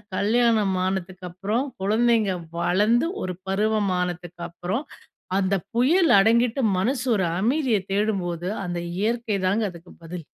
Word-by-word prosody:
கல்யாணம் 220 -2 +2
ஆனதுக்கு 185 -1 -4
அப்புறம் 210 +8 -1 0.2
குழந்தைங்க 220 0 +2 0.3
வளர்ந்து 210 - +2 0.2
ஒரு 185 -1 -3
பருவமானத்துக்கு 180 -4 -1
அப்புறம், 180 - -4 0.5
அந்த 195 0 +1 0.2
புயல் 315 +8 +4
அடங்கிட்டு 235 +5 +3 0.2
மனசு 250 +4 0
ஒரு 190 - +1
அமைதிய 245 0 +1
தேடும்போது, 185 -4 -1 0.2
அந்த 175 -1 -3 0.2
இயற்கைதாங்க 215 -2 0
அதுக்கு 170 0 -14
பதில்! 170 -1 -7
205 Hz, 110 wpm, -24 LUFS, 185-230 Hz, 0.5 s, புயல்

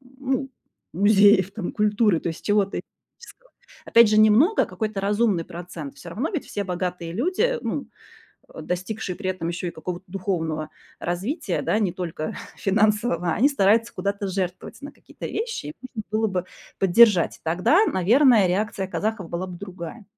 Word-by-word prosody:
ну 265 0 -4 0.4
музеев 200 0 +5
там 205 -4 -4
культуры, 210 -3 +2
то - - -4
есть 165 - -7
чего-то 205 -1 +1
этнического. - - -20 0.3
Опять 230 -2 +6
же, 215 0 +3
немного, 220 - +5
какой-то 215 -3 -4
разумный 205 -3 +1
процент, 170 -5 -8
всё 170 - -11
равно 235 - -2
ведь 335 -7 -3
все 205 - -4
богатые 180 -2 -4
люди, 375 - 0
ну, - - -3 0.7
э, - - -8
достигшие 185 +1 -4
при 190 -1 -4
этом 170 -3 -4
ещё 175 +1 -4
и - - -4
какого-то 180 +3 -6
духовного 165 -5 -3 0.3
развития, 190 - -2
да, 215 - +1
не 185 -5 0
только 170 -4 -5 0.2
финансового, 210 -3 +1
они 265 +7 +4
стараются 230 -3 +2
куда-то 200 0 -3
жертвовать 185 +3 -4
на 285 - -8
какие-то - - -10
вещи, 455 - -4
и 150 - -7 0.2
нужно 215 - -4
было 220 +1 +2
бы 185 -2 -2 0.3
поддержать. 195 -1 +5
Тогда, 185 - +3
наверное, 225 +2 +4
реакция 195 +1 -1
казахов 210 -1 -3
была 175 +2 -3
бы 175 -1 -9
другая. 190 +2 -8
200 Hz, 160 wpm, -24 LUFS, 180-225 Hz, 0.7 s, Опять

